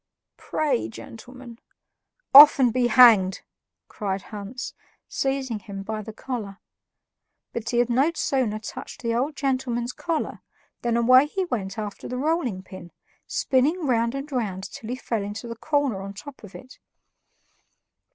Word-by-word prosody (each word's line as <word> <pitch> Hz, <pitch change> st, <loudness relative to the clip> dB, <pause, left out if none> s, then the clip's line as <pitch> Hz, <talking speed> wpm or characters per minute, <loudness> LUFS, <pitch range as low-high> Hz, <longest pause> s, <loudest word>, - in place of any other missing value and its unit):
"Pray, 200 Hz, -, -1 dB
gentlemen." 240 Hz, -, -11 dB, 0.7 s
"Off, 290 Hz, +2 st, +11 dB
and 250 Hz, -4 st, +3 dB
be 250 Hz, -1 st, +2 dB
hanged!" 220 Hz, -7 st, +6 dB, 0.5 s
cried 195 Hz, -2 st, -4 dB
Hans, 210 Hz, +5 st, -6 dB, 0.3 s
seizing 270 Hz, -4 st, -2 dB
him 195 Hz, -1 st, -8 dB
by 215 Hz, +1 st, -4 dB
the 220 Hz, -, -8 dB
collar. 215 Hz, -4 st, -6 dB, 1.0 s
But 225 Hz, -1 st, -4 dB
he 240 Hz, -, -1 dB
had 240 Hz, 0 st, +3 dB
no 270 Hz, +7 st, +3 dB
sooner 255 Hz, -8 st, 0 dB
touched 215 Hz, +3 st, -9 dB
the 230 Hz, 0 st, 0 dB
old 270 Hz, +6 st, -1 dB
gentleman's 255 Hz, -3 st, -2 dB
collar 330 Hz, -2 st, -3 dB, 0.4 s
than 235 Hz, -1 st, 0 dB
away 255 Hz, +4 st, +6 dB
he 380 Hz, +4 st, -2 dB
went 200 Hz, -, -4 dB
after 210 Hz, -2 st, -6 dB
the 250 Hz, -, -4 dB
rolling 265 Hz, -, -1 dB
pin, 185 Hz, -2 st, -11 dB, 0.4 s
spinning 300 Hz, +6 st, +1 dB
round 235 Hz, -1 st, +1 dB
and 275 Hz, +2 st, -6 dB
round 205 Hz, -8 st, -3 dB
till 225 Hz, -, -9 dB
he 250 Hz, -, -2 dB
fell 230 Hz, -4 st, -3 dB
into 205 Hz, +4 st, -6 dB
the 230 Hz, -, -6 dB
corner 280 Hz, -6 st, -1 dB
on 195 Hz, 0 st, -7 dB
the -, -, -22 dB
top 285 Hz, +2 st, -11 dB
of 205 Hz, -1 st, -12 dB
it. 255 Hz, +1 st, -13 dB
240 Hz, 150 wpm, -24 LUFS, 210-270 Hz, 1.0 s, Off